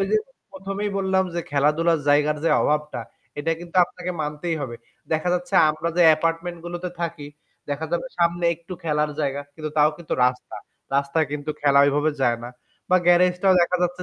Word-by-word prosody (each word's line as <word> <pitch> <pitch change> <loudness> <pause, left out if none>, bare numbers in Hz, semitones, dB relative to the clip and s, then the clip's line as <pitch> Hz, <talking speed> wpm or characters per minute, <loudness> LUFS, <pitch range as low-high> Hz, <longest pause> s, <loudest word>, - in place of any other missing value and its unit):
ওই 195 - +1
যে 215 - +4 0.4
প্রথমেই 195 +2 -4
বললাম 190 -1 +1
যে 170 - -1
খেলাধুলার 150 +3 +2
জায়গার 150 +1 +3
যে - - +3
অভাবটা 150 -4 0 0.4
এটা 165 +3 0
কিন্তু 175 +1 -8
আপনাকে 180 0 -7
মানতেই 150 +3 -3
হবে। 120 -4 -5 0.4
দেখা 160 +3 0
যাচ্ছে 180 0 -4 0.2
আমরা 155 +2 -3
যে 175 - +5
অ্যাপার্টমেন্ট 165 +2 +1
গুলোতে 175 +1 -4
থাকি, 170 -4 -4 0.4
দেখা 150 +3 -2
যাবে 175 +9 -1
সামনে 170 0 +1
একটু 170 +2 -12
খেলার 150 -1 0
জায়গা, 140 0 -1
কিন্তু 155 -1 -5
তাও 150 +1 +5
কিন্তু 170 - -4
রাস্তা। 125 0 -2 0.4
রাস্তায় 140 +2 +1
কিন্তু 150 +1 -3
খেলা 140 -1 +4
ঐভাবে 145 +2 +2
যায় 120 -2 +2
না। - - -6 0.4
বা 185 - +6
গ্যারেজটাও 180 +2 +4
দেখা 180 +1 +1
যাচ্ছে 180 +1 -1
165 Hz, 175 wpm, -23 LUFS, 150-175 Hz, 0.4 s, বা